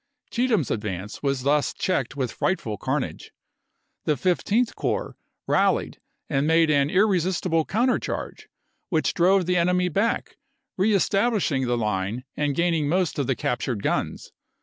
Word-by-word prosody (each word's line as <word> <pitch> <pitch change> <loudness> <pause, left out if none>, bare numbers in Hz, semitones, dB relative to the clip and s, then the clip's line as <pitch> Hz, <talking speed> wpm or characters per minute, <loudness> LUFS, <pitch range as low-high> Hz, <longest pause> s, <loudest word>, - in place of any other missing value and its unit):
Cheatham's 230 - +1
advance 105 -2 -4
was 135 -3 -1
thus 145 +1 +1
checked 145 -8 -1
with 130 -4 -2
frightful 115 - -1
carnage. 95 - -3 0.7
The 150 - +1
Fif 175 +7 +1
teenth 230 +3 +1
Corps - - -2 0.3
rallied - - +1 0.3
and 140 0 0
made 165 -1 +4
an 140 -1 +3
irresistible 185 -3 +2
counter 245 +5 +1
charge, - - -6 0.4
which 160 -5 +1
drove 185 +2 +3
the 180 +1 +1
enemy 180 +1 +2
back, 200 +7 -1 0.4
re 195 +4 +2
establishing 195 - +1
the 120 0 +1
line 105 +1 -2
and 145 -2 0
gaining 165 -4 +1
most 180 -2 0
of 140 - 0
the 135 - +1
cap 120 - -1
tured 110 -6 -3
guns. - - -2
160 Hz, 150 wpm, -24 LUFS, 135-185 Hz, 0.7 s, made